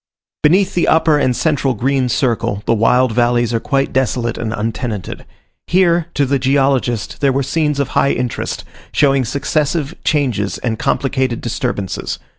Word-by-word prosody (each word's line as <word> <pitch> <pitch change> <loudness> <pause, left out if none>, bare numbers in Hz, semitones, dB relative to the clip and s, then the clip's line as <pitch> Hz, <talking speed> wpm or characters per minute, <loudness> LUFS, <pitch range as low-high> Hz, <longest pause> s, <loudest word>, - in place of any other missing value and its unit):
Beneath 185 +6 +3
the 175 - +1
upper 160 -2 +3
and 130 -3 +1
central 145 -4 0
green 130 +3 0
circle, 115 -4 0
the - - +2
wild 125 +3 +3
valleys 120 0 +1
are 115 - +1
quite 135 +2 -1
desolate 125 -3 0
and 110 -2 -4
untenanted. 110 -2 -4 0.4
Here, 175 -2 +2
to 145 - +2
the 135 +1 0
geologist, 135 -4 0
there 140 -1 +3
were 135 +1 0
scenes 150 +1 0
of 140 - 0
high 140 - +2
interest, 125 -1 -3 0.3
showing 135 -3 +2
successive 145 +4 -1
changes 125 -10 0
and 115 -3 -3
complicated 130 -3 0
disturbances. 120 -5 -3
130 Hz, 150 wpm, -17 LUFS, 120-145 Hz, 0.4 s, Beneath